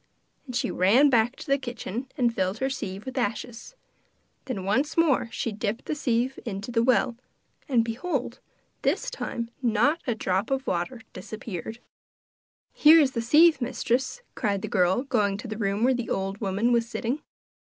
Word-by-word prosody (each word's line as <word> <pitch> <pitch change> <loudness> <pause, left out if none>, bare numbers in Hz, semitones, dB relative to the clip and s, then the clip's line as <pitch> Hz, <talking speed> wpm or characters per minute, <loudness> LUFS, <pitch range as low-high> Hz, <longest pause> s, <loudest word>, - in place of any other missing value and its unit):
And 250 - -6
she - - 0
ran 240 +11 +4
back 235 +1 +3
to - - -10
the 275 -2 +2
kitchen 245 -1 -5
and 240 -3 +2
filled 190 0 -1
her 265 +2 -1
sieve 200 -6 -5
with 260 0 -3
ashes. 240 - -4 0.7
Then 205 -8 -4
once 270 +12 0
more 295 -8 +3
she 230 - -2
dipped 215 +1 -3
the - - -2
sieve 255 -2 0
into 205 0 -5
the 230 -1 +2
well, 240 -1 +2 0.5
and, 235 -4 +3
behold, 250 +1 -3 0.4
this - - 0
time 235 -1 -4
not 245 +7 +2
a 240 - +1
drop 190 0 -1
of 270 0 -1
water 205 +7 -2
disappeared! 215 +1 -7 1.0
'Here 315 +2 +7
is 280 -4 +3
the 230 - -2
sieve, 300 +4 +5
mistress,' 260 - -1
cried 200 -2 -1
the - - -2
girl, 185 +5 +2
going 210 -8 +1
to 230 - -7
the 215 - -4
room 200 +1 0
where 260 +2 +4
the 240 -2 -3
old 195 +2 -2
woman 205 +4 +1
was 235 -1 +2
sitting. 245 +5 -2
235 Hz, 170 wpm, -26 LUFS, 210-265 Hz, 1.0 s, Here